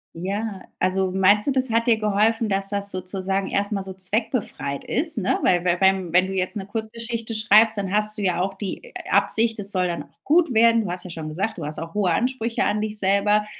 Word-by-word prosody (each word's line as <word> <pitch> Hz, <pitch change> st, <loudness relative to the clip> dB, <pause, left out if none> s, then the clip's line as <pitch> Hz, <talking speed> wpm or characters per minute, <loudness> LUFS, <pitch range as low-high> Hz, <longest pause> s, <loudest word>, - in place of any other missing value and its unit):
Ja, 195 Hz, +3 st, -4 dB, 0.2 s
also, 185 Hz, +1 st, +1 dB
meinst 200 Hz, +5 st, +3 dB
du, -, -, +3 dB
das 260 Hz, -1 st, 0 dB
hat 230 Hz, +2 st, +1 dB
dir 225 Hz, -2 st, +4 dB
geholfen, 215 Hz, +1 st, +1 dB
dass 195 Hz, 0 st, 0 dB
das 200 Hz, 0 st, -1 dB
sozusagen 190 Hz, +1 st, -2 dB
erst 200 Hz, +1 st, -1 dB
mal 200 Hz, -2 st, -1 dB
so 190 Hz, 0 st, -6 dB
zweckbefreit 190 Hz, -, -2 dB
ist, 300 Hz, +1 st, 0 dB
ne? 195 Hz, -, 0 dB
Weil 175 Hz, -1 st, +2 dB
weil 175 Hz, -1 st, +1 dB
wenn 190 Hz, -2 st, +2 dB
wenn 185 Hz, +1 st, +4 dB
du 195 Hz, -, -5 dB
jetzt 185 Hz, +3 st, -2 dB
'ne 195 Hz, -, -5 dB
Kurzgeschichte 225 Hz, +2 st, -4 dB
schreibst, 220 Hz, 0 st, +4 dB
dann 195 Hz, -1 st, -3 dB
hast 210 Hz, +1 st, +2 dB
du -, -, -4 dB
ja 180 Hz, -2 st, 0 dB
auch 190 Hz, +1 st, -2 dB
die, 195 Hz, -2 st, -6 dB
äh, -, -, -15 dB, 0.2 s
Absicht, 220 Hz, +3 st, +2 dB
es 200 Hz, 0 st, -6 dB
soll 185 Hz, -1 st, 0 dB
dann 170 Hz, -1 st, -4 dB
auch -, -, -27 dB
gut 320 Hz, -3 st, +3 dB
werden. 230 Hz, 0 st, +5 dB
Du 185 Hz, -5 st, -4 dB
hast 180 Hz, +1 st, -3 dB
ja -, -, -7 dB
schon 160 Hz, -2 st, -6 dB
gesagt, 190 Hz, +8 st, -3 dB
du 155 Hz, -, -5 dB
hast 150 Hz, +1 st, -4 dB
auch 165 Hz, 0 st, -7 dB
hohe 200 Hz, -4 st, +1 dB
Ansprüche 240 Hz, +2 st, -1 dB
an 210 Hz, 0 st, 0 dB
dich 215 Hz, 0 st, -2 dB
selber. 205 Hz, +2 st, +2 dB
200 Hz, 235 wpm, -23 LUFS, 185-220 Hz, 0.2 s, werden